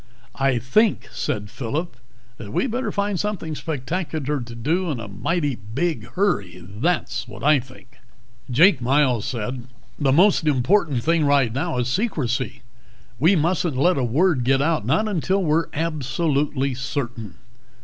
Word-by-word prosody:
"I 135 -2 +2
think," 205 - +1
said 105 -1 -3
Phillip, 145 +6 -4 0.4
"that 105 -3 -9
we'd 260 - 0
better 250 +3 -2
find 200 -2 -1
something 200 -7 -3
spectacular 150 -1 -3
to 120 0 -8
do 165 +10 0
in 140 -6 -2
a 115 - -6
mighty 145 - -1 0.2
big 170 +2 -1
hurry. 100 - -1
That's 125 - -1
what 105 0 -10
I 150 0 +5
think." 130 0 -15 0.5
Jake 160 +6 +5
Miles 130 -3 +2
said, 125 +1 -4 0.3
"The 140 -3 +2
most 175 +2 +4
important 145 - +2
thing 165 +2 +2
right 140 -5 +3
now 155 +2 -2
is 125 -1 0
secrecy. 130 - -2 0.6
We 165 +8 +5
mustn't 165 -2 0
let 170 +2 +3
a - - 0
word 140 +3 +2
get 135 +2 +3
out, 155 +3 0
not 215 - +2
until 190 0 0
we're 160 0 +1
absolutely 145 -2 -1
certain." 120 - -4
145 Hz, 150 wpm, -22 LUFS, 125-170 Hz, 0.6 s, I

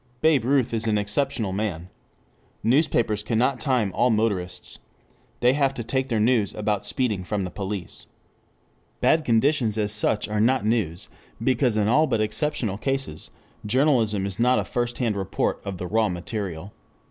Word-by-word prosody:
Babe 155 -7 +3
Ruth 130 -3 +2
is 115 0 -1
an 105 -1 +2
exceptional 105 +1 -1
man. 95 -4 -3 0.8
Newspapers 120 - +2
cannot 120 +4 0
time 125 -9 +1
all 125 - +2
motorists. 100 -6 -1 0.6
They 125 +1 +5
have 135 -1 +1
to 120 - -4
take 130 +3 -1
their 115 -3 +1
news 110 -2 +2
about 105 -1 -1
speeding 110 -9 -1
from 100 +1 -2
the 90 - -5
police.] 100 -3 -6
The - - -34 0.9
bad 160 0 +3
conditions 115 -2 +2
as 105 -1 +1
such 105 0 +1
are 105 0 -1
not 125 0 +2
news, 105 -5 -1 0.3
because 125 -2 +2
in 105 -1 +2
all 155 +8 +4
but 115 - 0
exceptional 110 -2 -1
cases, 135 - -3 0.3
journalism 115 -4 +2
is 100 +2 -5
not 125 +2 +4
a - - +1
first 120 -1 -3
hand 115 -5 0
report 95 -2 -2
of 100 -2 -5
the 90 - -5
raw 110 +3 +1
material. 90 0 -5
110 Hz, 165 wpm, -24 LUFS, 105-130 Hz, 0.9 s, They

